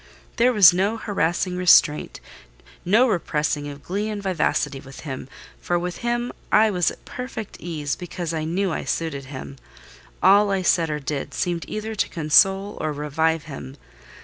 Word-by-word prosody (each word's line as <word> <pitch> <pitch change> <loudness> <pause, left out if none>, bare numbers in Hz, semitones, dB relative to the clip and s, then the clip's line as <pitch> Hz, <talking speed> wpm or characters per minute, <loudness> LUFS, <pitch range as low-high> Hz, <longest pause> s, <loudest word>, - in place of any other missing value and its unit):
There 245 +1 +4
was 200 -7 +8
no 200 +5 0
harassing 180 -3 -1
restraint, 170 -4 +4 0.6
no 220 +8 +4
repressing 150 -7 -1
of 145 0 -9
glee 205 +4 -2
and 210 -1 -4
vivacity 165 -6 0
with 135 0 -12
him; 135 -3 -7 0.3
for 175 - 0
with 175 0 -4
him 240 0 -2 0.2
I 215 0 +5
was 180 -3 +2
at - - -12
perfect 250 -4 -7
ease, 155 -4 -3
because 175 -2 -5
I 160 -1 -2
knew 180 +4 -1
I - - -3
suited 150 -5 -3
him; 135 0 -8 0.7
all 200 +2 +6
I 195 -1 0
said 165 -2 +2
or 150 0 -2
did 145 0 -4
seemed 175 -2 -2
either 215 +1 -4
to 215 - -1
console 190 +5 +3
or 155 0 -1
revive 155 +2 0
him. 135 -2 -9
175 Hz, 165 wpm, -23 LUFS, 150-200 Hz, 0.7 s, was